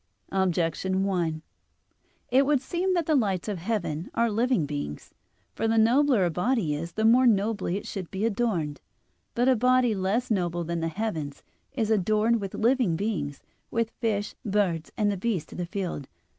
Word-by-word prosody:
Objection 190 0 0
1: 170 -5 -1 0.9
It 265 +3 +5
would 290 -2 +3
seem 355 +7 -1
that 340 -3 +1
the 315 - +1
lights 200 - +1
of 205 -4 -3
heaven 175 -4 -2
are 235 -1 +2
living 230 - +1
beings. 140 - -5 0.4
For 225 - -1
the 225 0 +2
nobler 240 -1 +4
a 175 - 0
body 180 - 0
is, 165 +3 -5
the 220 - 0
more 245 +3 +6
nobly 205 -3 +1
it - - -7
should 190 -4 -5
be 195 +3 -2
adorned. 195 -10 -1 0.5
But 245 +2 +2
a 260 - +5
body 250 0 +3
less 205 +6 -1
noble 175 -4 0
than 170 +1 -2
the 165 - -1
heaven, 165 -6 -3 0.4
is 225 -5 0
adorned 215 +3 +2
with 195 -1 -5
living 235 -6 +2
beings, 160 -8 -3 0.3
with 230 -1 -1
fish, 210 -3 -2
birds, 195 -7 0
and 210 -1 +2
the 200 - -2
beasts 185 -6 -2
of - - -8
the 175 - -2
field. 180 -8 -4
205 Hz, 175 wpm, -27 LUFS, 175-230 Hz, 0.9 s, more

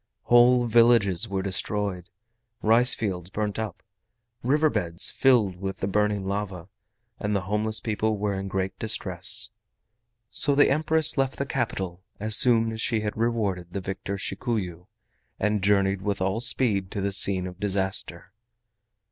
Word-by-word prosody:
Whole 120 +1 +5
villages 115 -4 +3
were 95 -1 -2
destroyed, 95 -1 -1 0.5
rice 120 +4 +5
fields 90 -5 -4
burnt 105 +1 -3
up, 110 -5 -6 0.6
river 150 +5 +2
beds 85 0 0
filled 115 -9 +2
with 95 0 -5
the 95 - -3
burning 105 0 0
lava, 95 -3 -4 0.5
and 105 -1 -2
the 100 - 0
homeless 105 +3 -1
people 110 -1 -1
were 100 0 -2
in 95 0 -4
great 95 0 -3
distress. 105 -1 +1 0.8
So 140 - +3
the 145 - +4
Empress 155 0 +1
left 135 0 0
the 140 - -2
capital 95 -9 -3 0.2
as 110 +1 +4
soon 115 -2 +5
as 110 0 -5
she 115 -1 0
had 105 -1 -4
rewarded 105 -6 -1
the 100 - -2
victor 95 +1 -5
Shikuyu, 95 -4 -4 0.5
and 105 0 0
journeyed 100 -1 +1
with 100 0 -2
all 95 +4 -1
speed 110 -6 0
to 100 - -3
the 100 +1 -1
scene 95 -1 +1
of 90 0 -9
disaster. 95 -2 -2
105 Hz, 150 wpm, -25 LUFS, 95-115 Hz, 0.8 s, Whole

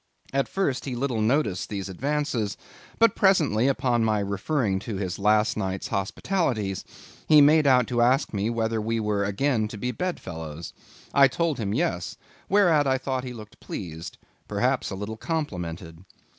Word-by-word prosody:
At 135 0 +1
first 190 -10 -1
he 130 -3 -3
little 120 -3 -1
noticed 110 -5 +1
these 100 -2 -4
advances; 130 - -2 0.4
but 230 -2 +4
presently, 135 - +3
upon 125 -3 +1
my 110 -1 +2
referring 100 +2 -1
to 105 +2 -5
his 95 -2 -3
last 105 +2 +3
night's 95 -3 -3
hospitalities, 105 - -1 0.4
he 155 - +7
made 150 +1 +6
out 125 -3 +5
to 120 -1 +1
ask 130 +3 +2
me 100 +2 0
whether 115 -1 -1
we 115 +1 -1
were 105 -2 0
again 110 +3 0
to 105 - -8
be 125 +4 -2
bedfellows. 85 - -5 0.4
I 140 -1 +7
told 155 0 -1
him 100 -3 -2
yes; 110 - -1 0.3
whereat 175 -8 +4
I 130 0 +3
thought 130 -1 -3
he 125 - -5
looked 110 -3 -12
pleased, 80 -3 -7 0.3
perhaps - - 0
a - - -4
little 105 +3 -5
complimented. 90 - -4
115 Hz, 160 wpm, -25 LUFS, 100-140 Hz, 0.4 s, he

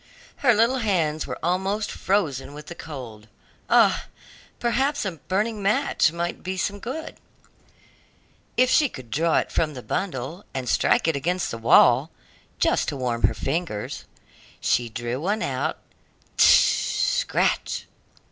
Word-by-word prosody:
Her 240 -5 +4
little 235 +5 +3
hands 165 -9 0
were - - -5
almost 190 +5 0
frozen 145 -8 -1
with 150 -1 -9
the 175 - -8
cold. 120 -10 -9 0.4
Ah! - - +4 0.5
perhaps 265 +3 0
a 190 - -1
burning 200 +7 -2
match 200 -4 +2
might 170 +1 -4
be 185 +1 -4
some 200 +2 -2
good, 290 +9 -6 1.4
if 255 - +5
she 290 +2 +4
could 125 - -11
draw 165 +2 +2
it - - -1
from 155 -3 0
the 125 - -8
bundle 165 0 -4
and 130 -2 -3
strike - - +2
it 165 - +2
against 175 +6 -1
the 115 - -5
wall, 125 +5 +5 0.5
just - - +1
to 145 - -3
warm 120 -3 -2
her - - -4
fingers. 140 -8 -3 0.5
She 120 -1 +1
drew 120 +3 -4
one 205 +6 -1
out - - -2 0.6
"scratch!" - - +2
170 Hz, 140 wpm, -24 LUFS, 135-205 Hz, 1.4 s, if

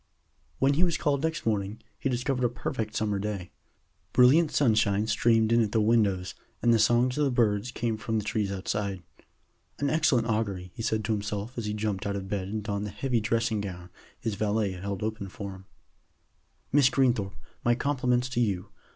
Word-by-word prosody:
When 135 +1 +3
he 160 +5 +2
was 170 -3 +2
called 140 -2 0
next 160 0 -2
morning, 105 -1 -1 0.2
he 135 - -1
discovered 125 +1 -1
a 120 - +3
perfect 110 -2 -4
summer 105 -2 0
day. 100 -3 -4 0.6
Brilliant 150 +6 +6
sunshine 110 -7 +2
streamed 115 0 +3
in 115 0 +5
at 105 -2 -1
the 115 - +3
windows, 105 -4 +2 0.3
and 120 -1 +3
the 115 - +4
songs 120 +5 +3
of - - +3
the - - +2
birds 115 -2 +1
came 115 -2 -2
from 110 +1 -2
the 105 - -1
trees 105 -2 -1
outside. 100 -1 -3 0.7
"An 140 -1 0
excellent 150 -7 +3
augury," 100 -5 -2
he - - -7
said 110 -1 -1
to 110 - -1
himself 105 +2 -3
as 115 -3 -3
he 105 - -1
jumped 105 -2 -2
out 100 - -1
of 95 -1 -4
bed 95 -2 -2
and 105 +1 -3
donned 100 0 -2
the - - -5
heavy 125 +4 -1
dressing 110 0 0
gown 90 -3 -7 0.3
his 115 -2 -2
valet 105 0 0
held 95 +2 -4
open 110 -2 -3
for 100 +1 -6
him. 95 0 -12 1.1
"Miss 140 -2 +5
Greenthorpe, 120 -7 +1 0.3
my 120 0 +3
compliments 125 -2 +1
to 125 - -2
you. 100 -6 0
110 Hz, 195 wpm, -28 LUFS, 100-120 Hz, 1.1 s, Brilliant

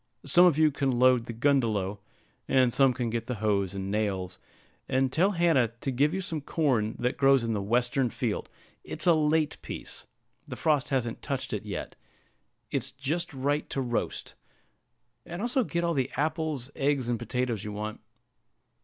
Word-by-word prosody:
Some 180 -1 +7
of 160 -5 +2
you 155 -1 +5
can 135 -1 0
load 125 -1 +4
the - - -4
gundelow, 110 -6 +1 0.5
and 130 -3 +3
some 135 -2 +5
can 120 -2 -2
get 115 0 -3
the 125 - -2
hoes 100 -3 0
and 95 0 -4
nails; 95 -4 -2 0.5
and 130 0 +2
tell 190 +8 +2
Hannah 165 -8 +3
to 135 - -2
give 140 +4 +2
you 190 +2 -2
some 160 -4 -3
corn 130 -8 0
that 125 +1 -1
grows 135 -2 +4
in 115 -1 -1
the 105 - -1
western 120 +4 +1
field, - - -3 0.3
it's - - -7
a 175 - +6
late 155 -1 +1
piece - - -8 0.4
the - - -6
frost 150 -4 +1
hasn't 120 -4 -1
touched - - -3
it - - -4
yet, - - -5 0.8
it's - - -1
just 145 +5 -3
right 145 +2 -1
to - - -3
roast; 120 -3 -2 0.9
and 175 +5 -7
also 245 +4 +1
get 170 -4 -2
all 170 0 +1
the 135 -4 0
apples, 155 -3 -1
eggs, 140 -3 0
and 120 -2 -1
potatoes 120 -2 -2
you 105 - -5
want." 105 +1 -5
130 Hz, 175 wpm, -28 LUFS, 115-150 Hz, 0.9 s, Some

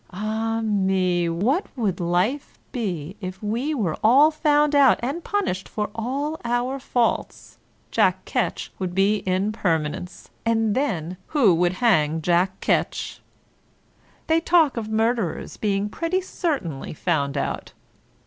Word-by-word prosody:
Ah 220 +3 -2
me, 190 -4 +1
what 235 - 0
would 210 -8 -1
life 180 +11 -1
be 190 - -3
if 185 +2 -6
we 240 +9 -1
were 190 - -1
all 275 +8 +6
found 300 -1 +2
out 280 -3 +5
and 290 +7 -2
punished 380 - -2
for 210 -1 -3
all 275 +7 -3
our 245 +3 -1
faults? 245 -3 -2 0.3
Jack - - +2
Ketch - - -2
would 180 -2 -3
be 200 +2 +3
in 190 +3 +1
permanence; 175 -3 -2
and 225 -2 +1
then 185 - -1
who 250 - +4
would 175 +2 +2
hang 165 -8 +2
Jack 180 +2 +1
Ketch? - - -1 1.0
They 320 +1 +3
talk 330 -4 +3
of 220 -2 -4
murderers 220 -4 -1
being 200 -1 0
pretty 335 - -1
certainly 275 - -3
found 145 -4 -1
out. - - -3
215 Hz, 130 wpm, -23 LUFS, 180-265 Hz, 1.0 s, all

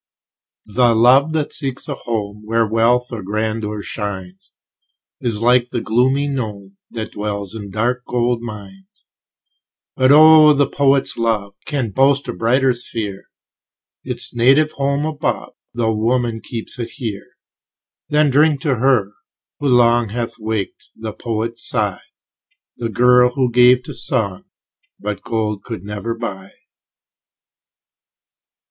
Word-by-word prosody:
The 115 +2 +2
love 130 +7 +5
that 155 -2 -2
seeks 135 -4 -5
a - - -2
home 105 -2 -4
Where 115 +1 +1
wealth 115 +3 +1
or 115 -3 -5
grandeur 105 +1 -3
shines, 95 -3 -6 0.7
Is 115 -3 -3
like 120 +1 +3
the 125 - -2
gloomy 130 +6 +1
gnome, 105 -8 -5
That 110 -2 -6
dwells 100 -1 -4
in 105 -3 -7
dark 120 +5 -1
gold 120 -1 0
mines. 100 -4 -11 0.9
But 130 +1 +4
oh! 155 0 +8
the 140 0 +3
poet's 140 -1 +1
love 110 -4 -1
Can 135 -8 -2
boast 135 +5 +2
a - - -3
brighter 125 +7 +2
sphere; 110 -5 -6 0.8
Its - - -5
native 135 +6 +4
home's 140 +1 -1
above, 150 - -3 0.2
Tho' 115 -2 +1
woman 115 +1 0
keeps 115 +1 -8
it 120 - -4
here. 110 -7 -6 0.7
Then 150 -1 +3
drink 145 +1 +3
to 145 -6 0
her, 115 -5 +2 0.5
who 145 - -1
long 120 -2 +4
Hath 115 +2 -3
waked 110 -2 -4
the 110 -1 -6
poet's 115 0 -4
sigh, 105 -6 -1 0.7
The 115 -1 -4
girl, 125 +2 +4
who 130 -3 +1
gave 125 +1 +5
to - - -8
song 100 -8 -3 0.5
What 105 -2 -5
gold 105 -3 -2
could 110 -6 -7
never 105 +3 -4
buy. 95 -5 -7
115 Hz, 130 wpm, -19 LUFS, 105-130 Hz, 0.9 s, oh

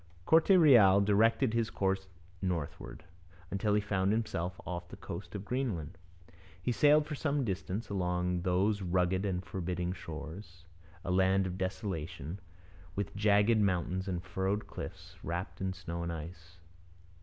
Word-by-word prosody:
Corte 160 - +4
Real 125 - +7
directed 110 +4 +3
his 115 -1 +1
course 95 0 -1 0.3
northward, 85 -4 -4 0.5
until 105 +2 +1
he 105 - +3
found 100 -1 0
himself 90 -5 -2
off 85 -1 -5
the - - -9
coast 85 +2 -7
of 100 0 -5
Greenland. 100 - -2 0.6
He 125 - -1
sailed 150 +4 +5
for 150 - -5
some 145 -2 0
distance 95 +2 -3
along 90 -2 -1
those 95 +3 +1
rugged 95 +2 +1
and 90 -1 -2
forbidding 90 -1 -3
shores, 90 +2 -9 0.4
a 90 - -1
land 95 +1 +3
of 90 -1 -3
desolation, 95 -3 -4 0.6
with 100 -1 -3
jagged 105 +2 +4
mountains 95 -1 0
and 90 -2 -2
furrowed 95 +3 -1
cliffs, - - -8
wrapped 85 +1 -4
in 95 0 0
snow 85 -2 -5
and 85 0 -3
ice. 85 +2 -8
95 Hz, 145 wpm, -32 LUFS, 90-105 Hz, 0.6 s, Real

